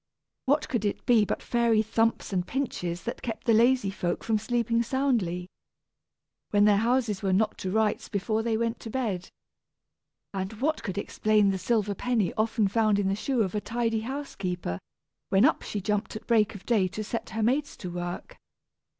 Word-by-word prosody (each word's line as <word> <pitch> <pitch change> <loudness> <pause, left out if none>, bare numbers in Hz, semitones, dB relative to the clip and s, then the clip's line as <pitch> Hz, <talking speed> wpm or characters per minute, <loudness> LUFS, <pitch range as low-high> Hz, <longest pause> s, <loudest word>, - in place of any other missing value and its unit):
What 290 +3 +2
could 240 -5 -1
it 205 - -2
be 230 -4 +5
but - - -3
fairy 235 -2 +2
thumps 225 -1 0
and 180 -1 0
pinches 180 -8 -3
that 235 - -5
kept 225 -2 -5
the 230 - +4
lazy 235 -2 +4
folk 175 -3 -2
from 220 -2 +1
sleeping 235 +1 +1
soundly, 230 -9 0 1.0
when 205 0 +4
their 205 -1 +5
houses 230 -2 +1
were 195 -2 0
not 210 +3 +2
to 185 - -3
rights 215 +1 0
before 215 +2 0
they 225 -1 0
went 230 0 -1
to 225 - -8
bed. 215 -7 -2 1.0
And 190 +1 -3
what 285 +8 -1
could 195 -2 -5
explain 210 0 +2
the 190 - -2
silver 210 -1 +1
penny 225 -2 0
often 220 -1 +1
found 215 0 +2
in 200 -1 +1
the 195 - +1
shoe 240 +2 0
of 190 - -3
a 210 - -1
tidy 230 0 -1
housekeeper, 195 - -4 0.5
when 195 +5 +5
up 315 - +3
she 210 - -4
jumped 210 +2 -2
at 215 - -7
break 220 -2 +3
of 195 - -10
day 215 -6 +3
to 195 +4 -5
set 230 +2 -4
her 220 0 -2
maids 270 +6 0
to 180 - -6
work? 175 0 -5
215 Hz, 185 wpm, -27 LUFS, 195-235 Hz, 1.0 s, be